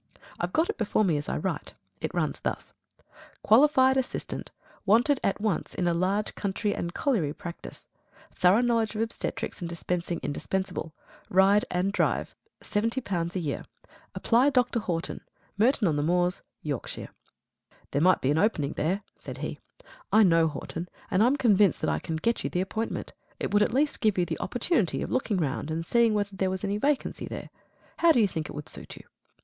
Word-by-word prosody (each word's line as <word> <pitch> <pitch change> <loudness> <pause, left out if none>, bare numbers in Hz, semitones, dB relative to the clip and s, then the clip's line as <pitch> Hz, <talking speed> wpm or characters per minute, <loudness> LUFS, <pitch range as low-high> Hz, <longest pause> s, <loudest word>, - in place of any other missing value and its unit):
I've - - -2
got 320 +2 +2
it - - -4
before 215 0 +2
me 170 -5 +2
as 145 - -4
I - - -1
write. - - -4 0.2
It - - -3
runs - - -1
thus: - - -4 0.7
Qualified 265 +2 +5
Assistant. 265 - -3 0.3
Wanted 245 +7 +4
at 195 - 0
once 210 -5 -1
in 180 - 0
a 170 - +3
large 190 +5 0
country 205 +1 -1
and 170 - -3
colliery 185 - 0
practice. 175 -2 -9 0.5
Thorough 185 +6 +4
knowledge 230 -3 +1
of 215 - -1
obstetrics 225 - -4
and 170 - -3
dispensing 170 0 -2
indispensable. 185 +1 -3 0.4
Ride 195 +3 +5
and 180 +2 0
drive. - - 0 0.3
L70 205 -6 -1
a - - +1
year. 150 -5 -3 0.5
Apply 245 +4 +3
Dr. 250 -3 +2
Horton 175 -6 -3 0.3
Merton 225 0 +3
on 155 -3 +1
the - - +1
Moors, 175 +3 +1 0.2
Yorkshire." 145 -5 -4 0.8
"There 140 - +1
might 185 +2 +4
be 135 - +2
an 155 - +2
opening 155 -9 +1
there," 190 +7 -1 0.2
said - - -8
he. - - -5 0.5
"I 220 - +6
know 165 -3 +5
Horton, 165 +3 -6 0.2
and 185 - +3
I 230 - +6
am 265 - +3
convinced 210 -8 +4
that - - +1
I - - 0
can 160 - -4
get 230 +9 0
you - - -1
the 180 - 0
appointment. 220 +4 -3 0.3
It - - -3
would 205 - +5
at 210 - +3
least 285 +4 +1
give 215 -4 +2
you 180 - +2
the - - -4
opportunity 245 - 0
of - - -5
looking 240 -6 0
round 150 -2 -2
and 165 +1 -2
seeing 230 +2 +3
whether 205 -1 -1
there 190 0 0
was 190 +1 -4
any 200 +1 -1
vacancy 285 +3 0
there. - - -7 0.5
How 335 0 +5
do 250 - +4
you 215 - +5
think 160 -5 -4
it - - -8
would 150 0 -6
suit - - -9
you?" - - -12
195 Hz, 190 wpm, -27 LUFS, 170-230 Hz, 0.8 s, I